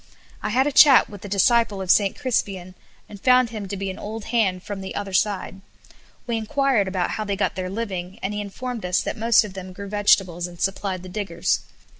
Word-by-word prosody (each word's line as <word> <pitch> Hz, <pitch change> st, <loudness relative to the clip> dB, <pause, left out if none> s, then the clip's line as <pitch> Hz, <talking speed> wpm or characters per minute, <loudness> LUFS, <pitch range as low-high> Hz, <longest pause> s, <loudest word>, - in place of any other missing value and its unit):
I -, -, -2 dB
had 255 Hz, +5 st, +2 dB
a 295 Hz, -, 0 dB
chat 275 Hz, -4 st, +7 dB
with 205 Hz, -2 st, -10 dB
the 205 Hz, -, -8 dB
disciple 205 Hz, +1 st, +3 dB
of 190 Hz, -2 st, +1 dB
St. 200 Hz, -2 st, +3 dB
Crispian, 195 Hz, -7 st, -2 dB, 0.3 s
and 205 Hz, -2 st, -12 dB
found 250 Hz, -2 st, +4 dB
him 210 Hz, -3 st, -6 dB
to 200 Hz, -, -5 dB
be 195 Hz, 0 st, -3 dB
an 185 Hz, -, -10 dB
old 220 Hz, +1 st, -6 dB
hand 190 Hz, -6 st, +1 dB
from 205 Hz, -2 st, -6 dB
the 190 Hz, -, -7 dB
other 200 Hz, -1 st, -4 dB
side. 195 Hz, -1 st, -1 dB, 0.6 s
We 235 Hz, -2 st, -1 dB
enquired 225 Hz, -4 st, 0 dB
how 185 Hz, +4 st, -1 dB
they 200 Hz, -1 st, -2 dB
got 195 Hz, -, 0 dB
their 185 Hz, -1 st, -4 dB
living, 190 Hz, -3 st, -5 dB
and 195 Hz, +2 st, -2 dB
he 210 Hz, -, -3 dB
informed 235 Hz, +3 st, -6 dB
us 180 Hz, 0 st, +1 dB
that -, -, -4 dB
most 225 Hz, +1 st, +4 dB
of 210 Hz, -3 st, -8 dB
them 185 Hz, -1 st, -8 dB
grew 200 Hz, +1 st, -8 dB
vegetables, 195 Hz, -4 st, +2 dB
and 175 Hz, -1 st, -13 dB
supplied 195 Hz, -1 st, -2 dB
the 185 Hz, -, -9 dB
diggers. 180 Hz, -3 st, -1 dB
200 Hz, 215 wpm, -23 LUFS, 190-220 Hz, 0.6 s, chat